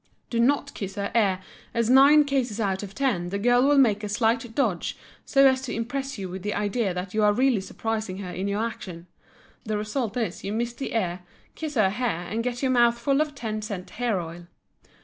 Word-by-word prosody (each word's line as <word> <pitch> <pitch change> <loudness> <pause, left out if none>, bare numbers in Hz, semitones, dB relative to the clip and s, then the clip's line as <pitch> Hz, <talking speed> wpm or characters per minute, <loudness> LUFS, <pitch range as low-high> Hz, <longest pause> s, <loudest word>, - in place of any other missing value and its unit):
Do 230 - 0
not 280 +4 +2
kiss 195 -2 -6
her 200 0 -3
ear 195 -5 +2 0.3
as 230 -1 +2
nine 275 +4 +7
cases 255 -6 -1
out 195 -3 0
of 200 -1 -8
ten 205 -11 0
the 200 - -2
girl 245 +4 +3
will 290 0 +4
make 220 -6 +4
a 210 - -3
slight 230 +1 0
dodge 220 -11 0 0.3
so 275 -1 +4
as 260 -1 +4
to 260 - -4
impress 270 +4 -3
you 195 -2 -4
with 185 +1 -7
the 210 +2 -2
idea 205 0 0
that 180 +1 -5
you 215 - +1
are 210 - +5
really 250 -2 +2
surprising 215 -1 -3
her 190 -2 -6
in 185 +3 -3
your 205 +3 0
action; 180 -7 -7 0.6
the 215 -2 -2
result 215 +2 -2
is 220 -7 -2
you 200 - -3
miss 235 +2 -1
the 270 +3 -5
ear, 180 -5 0 0.3
kiss 310 -2 -5
her 205 -5 +3
hair 210 -6 -2
and 225 +4 -2
get 245 +1 -3
your 260 - +2
mouth 240 -1 +4
full 275 +4 +1
of 300 -2 -2
ten 215 -5 -4
cent 200 -4 -6
hair 235 -6 -1
oil. 170 0 -8
225 Hz, 220 wpm, -25 LUFS, 200-250 Hz, 0.6 s, nine